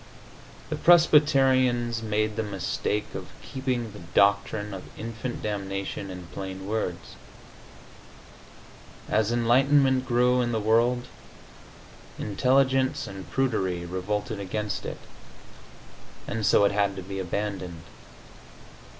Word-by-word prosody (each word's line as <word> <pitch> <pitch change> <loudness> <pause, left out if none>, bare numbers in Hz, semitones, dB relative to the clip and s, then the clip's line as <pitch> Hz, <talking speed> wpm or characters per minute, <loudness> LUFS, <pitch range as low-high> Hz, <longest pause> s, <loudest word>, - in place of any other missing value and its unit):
The - - 0
Presbyterians 135 -8 +4
made 110 -1 -1
the 110 - -1
mistake 105 +1 -2
of - - -6 0.2
keeping 125 -4 -3
the 105 - -11
doctrine 100 +3 +1
of 95 - -7
infant 115 +2 -5
damnation 100 -1 -4
in 90 -1 -8
plain 95 0 -6
words. 95 -5 -4 1.9
As 110 +1 +1
enlightenment 130 +2 +3
grew 125 +1 +3
in 120 -1 -1
the 110 - +1
world, 120 +3 +2 1.1
intelligence 130 +5 +2
and 95 -1 -9
prudery 95 -10 0
revolted 100 +4 -3
against 105 +2 -3
it, - - -5 1.3
and 110 -2 -1
so 100 - +5
it - - +3
had 100 -1 +1
to 95 - -6
be 95 +1 -6
abandoned. 95 -3 -4
110 Hz, 105 wpm, -26 LUFS, 100-125 Hz, 1.9 s, so